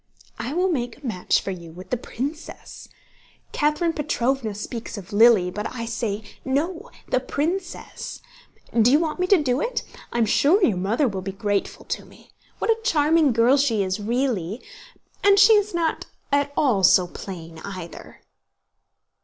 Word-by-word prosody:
"I 270 +6 -4
will 365 +1 +2
make 245 -6 -2
a 285 - -14
match 185 -7 +1
for 195 - -4
you 170 -3 -8
with 180 +3 -12
the - - +2
princess. 280 +6 -7 0.6
Catherine 300 +3 +1
Petróvna 265 -6 -1
speaks 225 +2 -6
of 200 +1 -9
Lily, 210 -4 +5
but 210 +3 -4
I 230 -2 -5
say, 225 -2 -3 0.2
no—the 325 - -2
princess! 340 +8 -4 0.6
Do 235 +3 +5
you 290 - +5
want 320 +1 -2
me 365 - +1
to 395 - +6
do 275 -3 0
it? 485 0 -2 0.3
I - - -3
am 230 - +3
sure 330 - +4
your 215 - +1
mother 215 +10 +1
will 195 -4 -3
be 195 +1 -4
grateful 200 +1 -2
to - - -4
me. - - -19 0.3
What - - +1
a 450 0 0
charming 310 - +3
girl 235 +4 +4
she 235 -8 +2
is, 190 +2 -2
really! 225 -3 -1 0.6
And 400 0 +6
she 420 +2 +8
is 420 -1 +3
not 335 -2 -1 0.2
at 285 0 +2
all 245 -9 +3
so 185 0 +6
plain, 165 -3 -9
either." 185 -4 -9
250 Hz, 165 wpm, -23 LUFS, 205-310 Hz, 0.6 s, she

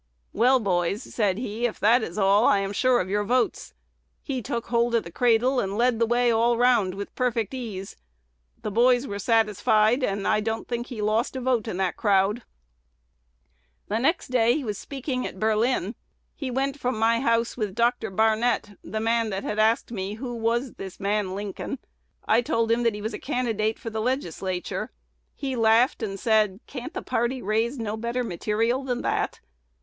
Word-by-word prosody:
'Well, 255 +4 +4
boys,' 195 +1 0
said 200 -5 0
he, 235 0 -1
'if 225 - -8
that 230 +4 +4
is 175 -3 -5
all, 200 +2 +4
I - - +5
am 195 0 -2
sure 255 +3 +3
of 185 - -1
your 205 +1 +1
votes.' 245 +4 0 0.5
He 265 -4 -3
took 235 +1 -3
hold 235 0 +2
of 230 - +2
the 170 - -10
cradle, 245 +5 +2
and 195 -1 -2
led 240 -1 +2
the 230 - +3
way 240 +1 +3
all 230 +1 +3
the - - -1
round 235 -7 +3
with 200 +1 -6
perfect 235 -3 -1
ease. 210 -7 -6 0.7
The 210 - -3
boys 245 +4 +4
were 200 -5 -5
satisfied, 220 +2 +3
and 200 -3 -1
I - - +3
don't 225 +1 -3
think 240 0 -3
he 225 -5 -5
lost 220 +5 0
a - - -2
vote 245 -3 0
in 190 - -3
the 190 -2 0
crowd. 205 +2 +2 1.5
"The 215 - 0
next 300 +6 +1
day 250 +3 +2
was 210 -4 -4
speaking 265 -2 -4
at - - -10
Berlin. 220 -1 +1 0.4
He 270 - -4
went 270 +3 -1
from 250 -3 -1
my 230 +1 +3
house 230 -2 +1
with 210 -5 -3
Dr. 235 -1 +1
Barnett, 220 +2 +1
the 215 +4 -4
man 230 0 +1
that 195 -1 -3
had 210 - -3
asked 220 +2 +2
me 200 -2 -4
who 240 0 -6 0.4
this 190 -2 -8
man 200 -1 -1
Lincoln 200 -1 -5
was. 270 - -4 0.5
I 225 +2 +4
told 230 -1 0
him 230 +1 +2
that 230 -3 +1
he 210 - -7
was 220 - -3
a - - -5
candidate 225 -5 -1
for 225 - -7
the 220 0 -2
Legislature. 190 - -2 0.5
He 270 -2 -3
laughed 230 +4 +3
and 195 -3 -4
said, 215 -3 +2
'Can't 255 -3 -7
the - - -4
party 240 +3 -1
raise 225 +6 0
no 220 -2 -3
better 235 +3 -2
material 225 +6 -1
than 250 -2 -2
that?' - - -1
225 Hz, 190 wpm, -25 LUFS, 210-245 Hz, 1.5 s, I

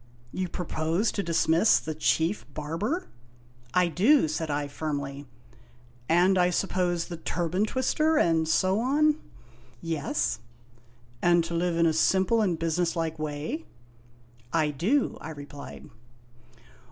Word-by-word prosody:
You 185 -1 -3
propose 170 +4 -1
to 200 - -2
dismiss 165 +3 +3
the 155 - -5
Chief 160 +4 +1
Barber? 180 - -2 0.2
" 120 0 -29
" 120 -1 -28
I 180 -1 +4
do," 200 - +4
said 155 +1 -3
I 145 0 -1
firmly. 145 -2 -4 0.4
" 120 0 -28
And, 180 +3 +4
I 180 0 +4
suppose, 180 -2 0
the 170 - -7
Turban 175 +4 -1
Twister, 305 +7 +1
and 165 - +2
so 185 +5 +2
on? 300 +5 +2 0.3
" 120 0 -27
"Yes." 155 - -1 0.8
"And 175 -1 +4
to 170 +1 -5
live 170 0 0
in 170 - +4
a 160 - +3
simple 190 +7 +3
and 180 -6 +1
businesslike 165 -1 -1
way?" 155 - -4 0.4
" 120 0 -29
I 150 - -1
do," 210 - 0
I 160 - -7
replied. 145 0 -9
165 Hz, 140 wpm, -27 LUFS, 150-190 Hz, 0.8 s, I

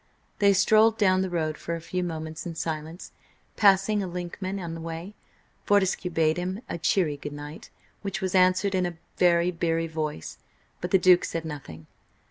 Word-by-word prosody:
They 200 -1 +5
strolled 215 +3 +4
down 185 -3 +3
the 190 - -1
road 155 -3 -2
for 170 - -3
a - - -5
few 180 +2 -3
moments 160 0 -5
in 165 - -6
silence, 160 +2 -5 0.4
passing 200 0 +4
a 190 - -3
1inkman 180 +2 -5
on 170 -3 -5
the 165 - -7
way. 165 +4 -6 0.5
Fortescue 195 -2 +2
bade 160 -1 +1
him 185 +4 -3
a - - -5
cheery 160 -2 +1
goodnight, 145 +1 -8 0.3
which 195 -1 -3
was 190 -2 -2
answered 185 +1 +3
in 185 -1 +1
a 170 -2 -7 0.2
very 175 0 +4
beery 165 -1 0
voice, 155 - -5 0.4
but 180 - -3
the 190 - +5
Duke 180 -1 +5
said 165 -1 -3
nothing. 110 - -8
175 Hz, 175 wpm, -26 LUFS, 160-190 Hz, 0.5 s, They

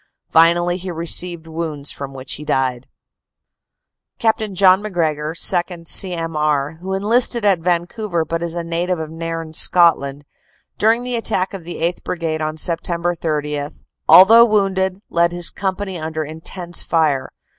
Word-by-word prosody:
Finally 175 +2 +3
he 185 0 -7
received 170 0 -1
w 165 +1 -5
r 155 - -6
ounds 145 0 -4
from 140 -1 -6
which 130 -1 -5
he 150 - -6
died. 130 -4 -1 1.3
Capt. 220 -2 +1
John 185 +1 +5
MacGregor, 160 -6 -2
2nd. 175 -1 +2
C.M.R., 160 -5 +1
who 190 +1 -3
enlisted 230 +3 +1
at 195 -4 +3
Van 170 0 0
couver 175 -4 -3
but 165 +1 -3
is 170 0 -2
a 170 - -3
native 170 +2 -2
of 160 -1 -6
Nairn, 165 -1 -6
Scotland, 145 -5 +3 0.5
during 225 +3 +2
the 250 0 -3
attack 210 -5 -1
of 195 -3 -7
the 175 - -7
8th. 170 +2 -2
Brigade 165 -3 -3
on 155 0 -3
Sept. 170 +1 -1
30, 150 -2 -3 0.4
although 225 +5 +9
wounded, 195 -3 0
led 170 0 +2
his 175 -1 +2
com 190 -2 -2
pany 190 -4 -6
under 160 0 -3
intense 170 +3 -5
fire. 150 -5 0
170 Hz, 155 wpm, -18 LUFS, 155-185 Hz, 1.3 s, although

